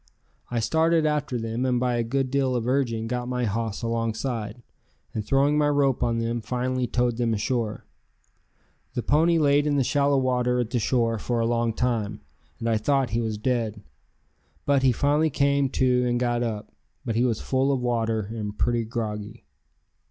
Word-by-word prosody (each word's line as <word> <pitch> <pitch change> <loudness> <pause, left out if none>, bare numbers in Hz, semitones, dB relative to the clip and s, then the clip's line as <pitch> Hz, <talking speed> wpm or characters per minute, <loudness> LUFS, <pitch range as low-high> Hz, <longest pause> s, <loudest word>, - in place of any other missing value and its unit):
I 120 - -1
started 160 +6 +2
after 150 -4 0
them 115 +1 -3
and 125 -1 +1
by 125 0 +1
a 120 - +1
good 130 +2 -1
deal 135 -2 +1
of 120 -1 -1
urging 125 -4 0
got 125 +1 -3
my 125 -1 -1
hoss 110 +1 -2
alongside, 115 0 -2 0.5
and 110 - -2
throwing 140 +6 +2
my 145 -1 +3
rope 140 -3 +2
on 115 -1 +1
them 115 +1 -1
finally 125 +1 -1
towed 120 -1 0
them 115 -2 +1
ashore. 110 0 -2 1.1
The 120 - -1
pony 165 +3 +3
laid 145 -1 +3
in 145 - +1
the 135 - +3
shallow 140 +1 +2
water 125 -1 +1
at 120 -2 -2
the 125 - +1
shore 115 0 +1
for 120 +3 -1
a 115 - +1
long 115 0 +1
time, 110 -4 -1 0.4
and 115 - -4
I 115 -1 +2
thought 135 +1 +1
he 115 +1 0
was 110 -2 -2
dead, 110 -3 -1 0.8
but 140 -1 +3
he 130 -1 +4
finally 145 +6 +2
came 140 -1 +2
to 125 -1 +2
and 120 0 +1
got 120 -1 0
up. 110 -3 -3 0.3
But 115 - -1
he 120 - +2
was 115 -4 +1
full 135 +1 +1
of 135 - +1
water 115 -2 0
and 105 0 -5
pretty 120 -1 +1
groggy. 105 - -5
120 Hz, 185 wpm, -25 LUFS, 115-135 Hz, 1.1 s, he